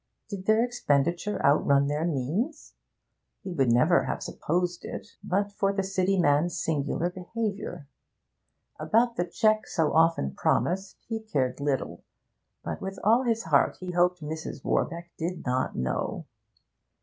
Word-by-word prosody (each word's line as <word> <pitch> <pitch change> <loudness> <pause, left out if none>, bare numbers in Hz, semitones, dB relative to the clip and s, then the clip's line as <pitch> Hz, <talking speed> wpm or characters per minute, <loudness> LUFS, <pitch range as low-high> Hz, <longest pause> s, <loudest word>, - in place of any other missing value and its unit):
Did 195 -2 -6
their 220 +2 +4
expenditure 175 - 0
outrun 140 -1 +4
their 150 +3 -1
means? 170 - -2 0.7
He 190 - -5
would 135 -7 +2
never 155 +9 +4
have - - -3
supposed 175 +2 -2
it, - - -7
but 200 +2 0
for 195 -1 +1
the 195 -1 -1
City 190 0 +1
man's 165 +2 +2
singular 160 +3 -1
behaviour. 200 -4 -4 0.9
About 235 +1 +2
the 175 - 0
cheque 215 +4 +2
so 160 -3 0
often 160 - +3
promised 190 - 0
he 225 -1 -2
cared 135 -13 -1
little, 135 -12 -2 0.6
but - - -5
with 195 0 -5
all 225 +4 +5
his 230 -1 +1
heart 150 -4 +3
he 185 -1 -5
hoped 180 -1 +2
Mrs. 155 -2 -6
Warbeck 170 0 -1
did 170 +1 -3
not 130 0 0
know. 65 0 -2
175 Hz, 140 wpm, -27 LUFS, 145-200 Hz, 0.9 s, all